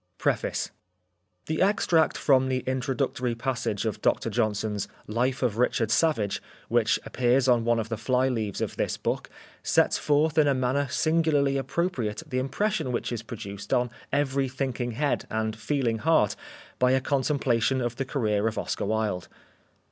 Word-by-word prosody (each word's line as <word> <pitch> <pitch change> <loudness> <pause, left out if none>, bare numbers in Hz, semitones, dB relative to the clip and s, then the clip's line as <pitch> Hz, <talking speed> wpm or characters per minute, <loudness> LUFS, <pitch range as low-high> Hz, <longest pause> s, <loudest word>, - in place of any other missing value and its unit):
Preface - - -1 0.7
The 160 0 -2
extract 180 -5 +3
from 130 -2 +3
the 130 -1 -1
introductory 130 -1 -1
passage 115 -4 -2
of 110 - -2
Dr 115 - +1
Johnson's 105 -2 -1 0.2
''Life 125 +5 0
of 115 -3 0
Richard 115 -3 +1
Savage" 110 -10 +1 0.3
which - - +2
appears 125 +1 +2
on 120 -2 +3
one 120 0 +3
of 110 -1 -2
the 115 - -2
fly 130 +3 +2
leaves 110 -6 -2
of - - -3
this - - -1
book - - -2 0.3
sets - - +2
forth 150 +1 +2
in 150 - +5
a 140 - +3
manner 130 +2 +1
singularly 155 -2 +2
appropriate 135 - -2
the 130 -4 -1
impression 160 +3 -1
which 120 - -2
is 120 -2 -3
produced 100 -3 -8
on 125 -1 +1 0.2
every 135 -1 +1
thinking 130 -2 -3
head 145 +4 -1
and 110 0 -1
feeling 115 -1 -1
heart 145 -8 +3 0.4
by 125 0 +4
a 130 - +4
contemplation 135 -2 +1
of 120 -2 -2
the 135 - -1
career 110 -6 0
of 110 - -3
Oscar - - -2
Wilde. 110 -5 -1
125 Hz, 160 wpm, -27 LUFS, 115-140 Hz, 0.7 s, in